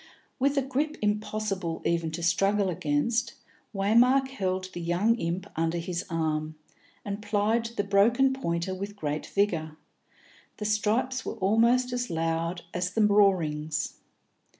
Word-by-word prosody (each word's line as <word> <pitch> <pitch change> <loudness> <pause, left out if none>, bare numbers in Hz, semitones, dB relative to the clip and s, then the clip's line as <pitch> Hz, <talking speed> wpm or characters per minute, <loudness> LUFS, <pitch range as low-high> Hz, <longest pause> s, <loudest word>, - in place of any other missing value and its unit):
With 280 +2 +2
a 275 - +3
grip 285 +4 -2
impossible 210 -4 -2
even 170 -1 +1
to 170 - -4
struggle 195 +3 +2
against, 165 +10 0 0.4
Waymark 240 +7 +3
held 185 -7 -2
the 175 - -5
young 175 +7 +2
imp 175 0 -2
under 165 +1 0
his 170 +1 -3
arm, 155 -2 -1 0.5
and 200 0 -4
plied 210 +2 +1
the 205 - +1
broken 230 +7 +3
pointer 170 -7 -2
with 200 +2 -6
great 150 -5 -3
vigour; 165 -6 -1 0.8
the 210 - -5
stripes 220 +5 0
were - - -4
almost 230 +5 +3
as 245 -2 -2
loud 165 +1 -1
as 180 0 -1
the 215 +2 +2
roarings. 160 -7 +2
200 Hz, 135 wpm, -27 LUFS, 170-225 Hz, 0.8 s, a